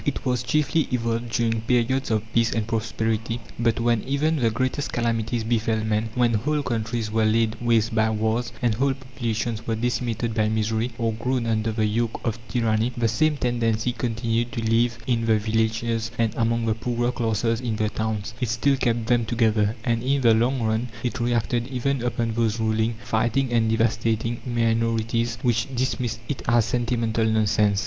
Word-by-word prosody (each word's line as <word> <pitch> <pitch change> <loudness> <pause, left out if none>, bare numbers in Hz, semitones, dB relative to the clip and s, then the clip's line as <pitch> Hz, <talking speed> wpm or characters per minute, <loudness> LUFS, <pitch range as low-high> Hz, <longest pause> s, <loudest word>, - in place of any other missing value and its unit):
It 145 - -2
was 125 -2 +1
chiefly 150 +4 +1
evolved 115 -1 -1
during 115 -1 0
periods 125 +3 +1
of 110 -2 +1
peace 115 0 +2
and 110 -2 -1
prosperity; 115 0 -1 0.2
but 115 -1 +1
when 115 -2 +2
even 145 +5 0
the 120 -5 +2
greatest 130 +5 -1
calamities 115 -1 -1
befell 110 -1 0
men 110 +1 0
when 120 -2 +3
whole 145 +7 0
countries 110 -2 -2
were 110 0 +2
laid 110 +1 +2
waste 115 -1 +2
by 110 0 +3
wars, 110 +2 0
and 120 -2 +3
whole 135 +4 +1
populations 120 -4 -4
were 115 - 0
decimated 120 -1 -1
by 110 -1 +1
misery, 110 +2 0
or 115 -2 0
groaned 125 +2 -1
under 110 -1 0
the 110 0 0
yoke 115 +2 -1
of 115 -2 -1
tyranny 115 -1 +1
the 120 -1 +2
same 150 +7 +1
tendency 120 -2 0
continued 115 0 -1
to 115 - -2
live 115 +1 +2
in 120 -2 +1
the 110 -1 +4
villages 110 +1 0
and 115 -2 +1
among 115 0 0
the 110 - +2
poorer 120 +2 -1
classes 115 0 0
in 120 -3 -2
the 110 0 0
towns; 110 0 -3
it 125 - 0
still 135 +4 +2
kept 115 -3 0
them 120 0 +2
together, 110 -2 +1
and 115 -2 0
in 135 +2 +1
the 115 -3 +5
long 120 +3 +1
run 110 +2 0 0.2
it 125 +1 -2
reacted 120 0 0
even 135 0 -1
upon 115 -1 -1
those 115 -1 0
ruling, 110 +1 +1
fighting, 120 +2 0
and 115 -1 +3
devastating 115 +1 0
minorities 115 0 0
which 115 -3 +1
dismissed 125 -2 -1
it 145 - -3
as 115 -1 +4
sentimental 115 -1 0
nonsense. 105 -2 +2
115 Hz, 180 wpm, -24 LUFS, 110-120 Hz, 0.2 s, the